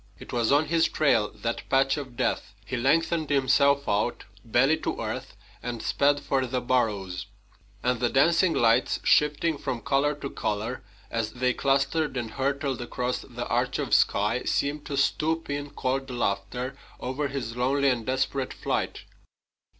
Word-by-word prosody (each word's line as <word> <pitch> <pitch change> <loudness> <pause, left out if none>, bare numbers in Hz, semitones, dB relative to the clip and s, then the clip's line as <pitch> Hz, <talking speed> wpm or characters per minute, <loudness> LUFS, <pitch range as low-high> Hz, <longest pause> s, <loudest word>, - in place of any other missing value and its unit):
It - - -11
was 120 -1 +1
on 145 +2 +4
his 165 +1 +3
trail, 120 -8 +2
that 115 +2 -3
patch 135 0 +3
of 130 -5 -7
death. 125 -5 -1
He 130 - -3
lengthened 155 +5 +1
himself 140 0 +3
out, 105 +4 0 0.2
belly 135 +7 +3
to - - -3
earth, - - -5 0.3
and 120 -1 -4
sped 145 0 +2
for 135 -2 0
the 125 +1 -1
burrows. 100 -7 -1 0.6
And 125 -1 +1
the 120 - +1
dancing 165 +6 +3
lights, 115 +1 +3
shifting 150 +1 +3
from 120 -4 -3
color 140 +1 +1
to 140 -1 -6
color 110 +4 -3 0.3
as 115 -1 -2
they 125 0 +1
clustered 140 +2 +1
and 115 -3 -3
hurtled 135 0 -1
across 125 +1 -2
the - - -6
arch - - 0
of - - -2
sky, - - +3
seemed 145 +1 -1
to 140 -3 -3
stoop 160 +3 0
in 145 0 -3
cold 135 -1 -2
laughter 125 +2 -2 0.2
over 135 +3 -2
his 130 -4 -4
lonely 135 +3 +2
and 120 -3 0
desperate 130 +2 -1
flight. - - -2
135 Hz, 160 wpm, -27 LUFS, 120-145 Hz, 0.6 s, on